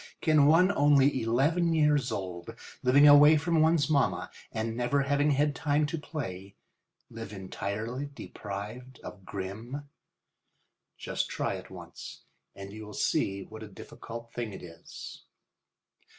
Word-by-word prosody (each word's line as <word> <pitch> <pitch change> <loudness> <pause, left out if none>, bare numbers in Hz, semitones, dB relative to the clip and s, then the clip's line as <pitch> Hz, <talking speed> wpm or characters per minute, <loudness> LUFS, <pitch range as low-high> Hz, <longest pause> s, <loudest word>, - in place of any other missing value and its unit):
Can 155 -4 +4
one 175 +5 +5
only 145 -5 +4
eleven 150 +9 +2
years 150 -4 +2
old, 90 -3 -5 0.3
living 140 +4 +6
away 145 +2 +8
from 160 +1 +1
one's 160 -2 +3
mamma, 140 -4 +1 0.2
and 110 +1 -3
never 125 +4 +1
having 145 +2 +2
any 145 +2 +2
time 150 +1 0
to 155 +2 -3
play, 100 - -6 0.6
live 115 -1 -8
entirely 105 +7 -4
deprived 120 +1 -8
of 95 - -10
Grimm? 110 +10 -6 1.1
Just - - -3
try - - -2
it - - -8
once - - -10 0.3
and 100 0 -9
you 110 0 -8
will 105 -1 -10
see 95 0 0
what 110 +2 -11
a 110 - -7
difficult 115 +3 -10
thing 115 -4 -4
it - - -9
is. 85 -1 -10
130 Hz, 135 wpm, -29 LUFS, 105-145 Hz, 1.1 s, away